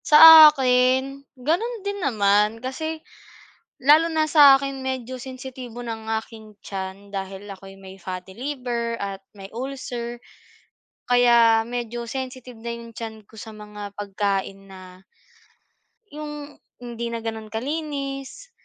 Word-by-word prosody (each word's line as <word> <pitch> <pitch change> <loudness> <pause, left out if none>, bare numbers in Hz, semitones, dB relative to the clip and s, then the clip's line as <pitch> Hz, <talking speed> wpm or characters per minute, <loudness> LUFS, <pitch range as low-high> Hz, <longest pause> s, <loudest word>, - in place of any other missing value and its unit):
Sa 315 0 +11
akin 260 0 +1 0.2
gano'n 395 - -2
din 405 0 -3
naman 210 - +2
kasi, 315 +6 -5 0.8
lalo 300 +5 +6
na 315 -2 0
sa'kin 275 -2 +6
medyo 260 -1 -4
sensitibo 255 -2 -8
ng 225 -2 -6 0.2
aking 220 -2 -14
tiyan 195 +1 -7
dahil 195 0 -6
ako'y 195 0 -11
may 195 0 -13
fatty 185 +1 -8
liver 245 -4 -3
at 195 -1 -4 0.2
may 195 -1 -11
ulcer, 240 -1 -6 0.9
kaya 235 -2 +5
medyo 240 0 -5
sensitive 255 0 -6
na 235 - -4
'yung 235 0 -8
tiyan 220 -2 -8
ko - - -22
sa 220 +1 -9
mga 210 -1 -10
pagkain 195 -1 -3
na 185 -1 -13 1.1
yung 295 -1 -8 0.2
hindi 235 -1 -5
na 230 -1 -5
gano'n 220 -1 -5
kalinis. 275 - -5
240 Hz, 120 wpm, -23 LUFS, 210-275 Hz, 1.1 s, Sa